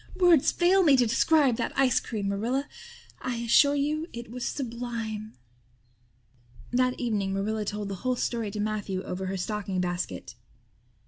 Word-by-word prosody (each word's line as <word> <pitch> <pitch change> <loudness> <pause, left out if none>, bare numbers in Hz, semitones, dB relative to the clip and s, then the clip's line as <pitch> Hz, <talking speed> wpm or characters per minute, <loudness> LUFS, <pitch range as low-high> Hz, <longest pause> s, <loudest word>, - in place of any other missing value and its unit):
Words 350 -6 +5
fail 365 +2 +4
me 290 -7 +5
to 250 - +4
describe 260 +2 +3
that - - -3
ice 265 -2 +4
cream. 210 -4 -4
Marilla, 240 +8 -1 0.5
I 255 -1 -2
assure 235 +5 +4
you 305 +3 -1
it 235 -1 -8
was 250 0 -5
sublime." 230 -4 -4 1.4
That 255 +1 +1
evening 210 -5 -1
Marilla 210 +2 -1
told 205 0 -3
the 200 - -4
whole 255 0 0
story 230 -3 -2
to 210 +1 -6
Matthew 205 -3 -2
over 190 +1 -4
her 190 +1 -2
stocking 195 0 -3
basket. 175 -7 -3
235 Hz, 150 wpm, -27 LUFS, 205-260 Hz, 1.4 s, Words